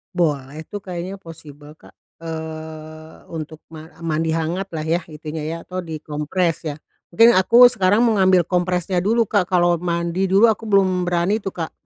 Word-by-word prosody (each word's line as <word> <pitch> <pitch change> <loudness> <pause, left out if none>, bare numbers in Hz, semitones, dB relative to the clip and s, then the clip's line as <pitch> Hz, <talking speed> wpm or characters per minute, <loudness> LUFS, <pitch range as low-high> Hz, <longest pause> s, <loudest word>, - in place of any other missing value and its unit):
Boleh 150 -3 -1
tuh, 205 - -6
kayaknya 185 +1 -6
possible 150 -3 -13
Kak, - - -18 0.3
eee, 160 -1 -8
untuk 155 -1 -7
ma 160 0 -12
mandi 160 -1 -1
hangat 165 +4 -2
lah 155 -1 -4
ya, 170 +2 0
itunya 155 0 -6
ya, 165 +2 -4
atau 185 0 -5
dikompres 155 +2 -3
ya, - - -8 0.4
mungkin 230 +7 +6
aku 235 +6 +7
sekarang 205 +1 +2
mau 220 - +2
ngambil 185 -3 +3
kompresnya 180 0 0
dulu, 230 +2 +2
Kak, 195 -3 +1
kalau 175 -1 +3
mandi 170 +2 -1
dulu 200 +4 +6
aku 220 0 0
belum 190 -3 +2
berani 180 +5 0
tuh, 195 - -3
Kak. 165 -2 -4
170 Hz, 165 wpm, -21 LUFS, 160-190 Hz, 0.4 s, aku